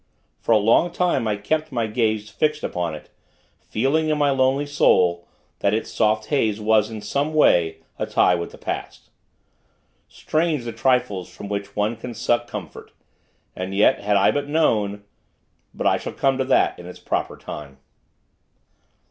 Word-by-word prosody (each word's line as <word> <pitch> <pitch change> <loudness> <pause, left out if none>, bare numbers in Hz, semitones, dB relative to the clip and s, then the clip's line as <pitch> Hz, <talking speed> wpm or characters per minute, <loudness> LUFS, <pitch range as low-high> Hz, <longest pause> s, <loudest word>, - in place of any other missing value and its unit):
For - - -2
a 110 - +7
long 115 +11 +3
time, 170 -9 0
I 105 - +1
kept 155 +10 -2
my 120 -3 0
gaze 110 -1 -1
fixed 150 +7 -1
upon 85 -3 -2
it; 75 - -13 0.5
feeling, 145 +8 0
in 155 - +1
my 145 -1 +2
lonely 135 +1 +2
soul, 85 -11 +2 0.3
that 100 - +2
its 110 - -3
soft 110 0 +1
haze 110 -7 +1
was, 110 0 +2
in 110 -2 -7
some 140 +8 -2
way, 80 - +3 0.2
a - - -2
tie - - +3
with 85 -1 -2
the - - -14
past. - - -6 1.0
Strange, 155 -4 -1
the 120 - -4
trifles 115 -6 0
from 100 +2 -9
which 100 -1 -4
one 105 +3 0
can 120 +1 -8
suck 120 +1 0
comfort! - - -8 0.6
And 95 +1 -4
yet, 105 +6 +4
had 105 0 +1
I 100 - +4
but 145 0 -2
known 105 -10 +1 0.7
But - - -6
I - - +4
shall - - -6
come 135 -1 +1
to 130 - +1
that 130 - +2
in 90 - -10
its 90 - -10
proper - - -3
time. 70 -3 -9
110 Hz, 170 wpm, -22 LUFS, 100-135 Hz, 1.0 s, a